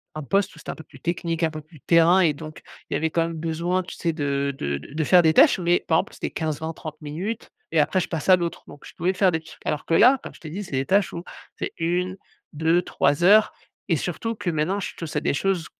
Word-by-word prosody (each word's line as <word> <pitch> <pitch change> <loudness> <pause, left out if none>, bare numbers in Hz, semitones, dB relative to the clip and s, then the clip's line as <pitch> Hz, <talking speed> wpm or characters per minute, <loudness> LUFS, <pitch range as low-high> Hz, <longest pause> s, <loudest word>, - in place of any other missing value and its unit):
«un 155 - -4
poste 195 +6 0
où - - -15
c'était - - -8
un - - -4
peu 160 - -12
plus - - -17
technique, 170 -1 -2
un 165 - +3
peu 155 0 -7
plus 155 0 -18
terrain» 170 +4 +5
et 165 -5 +4
donc, 155 +1 -10 0.3
il - - -2
y - - +2
avait 160 +1 0
quand 165 - +1
même 165 0 -3
besoin, 170 +3 -1
tu 180 - -9
sais? 165 -1 -1
De 140 -2 -1
de 70 0 -2
de 110 - -13
de 155 0 0
faire 180 +3 +6
des 160 -1 +3
tâches, - - +6
mais 175 0 +1
par 160 - +3
exemple, - - -3
c'était - - -4
15-20-30 155 0 -4
minutes 170 +9 -5 0.2
et 160 - +4
après 170 +6 +2
je - - -3
passe 165 +1 -4
à 185 - +9
l'autre, 170 -1 -4
donc 145 - -14
je - - -12
pouvais 180 +3 0
faire 190 -1 +3
des 160 - -1
trucs. 160 - -15
Alors 150 - -1
que 165 - 0
là, 250 +10 +6
comme - - -9
je - - -16
t'ai 155 - -8
dit: 200 +6 -5
«C'est 175 - -13
des 135 0 0
tâches 200 0 +2
où 170 - -5 0.4
c'est - - -3
1-2-3 170 -3 -1
heures» 210 +3 +6 0.4
et 165 - +3
surtout 185 +9 -3
que 195 -4 -3
maintenant, 170 +5 0
je - - -5
touche 165 -3 -6
à - - +2
des - - 0
choses 180 +2 0
165 Hz, 265 wpm, -24 LUFS, 155-180 Hz, 0.4 s, à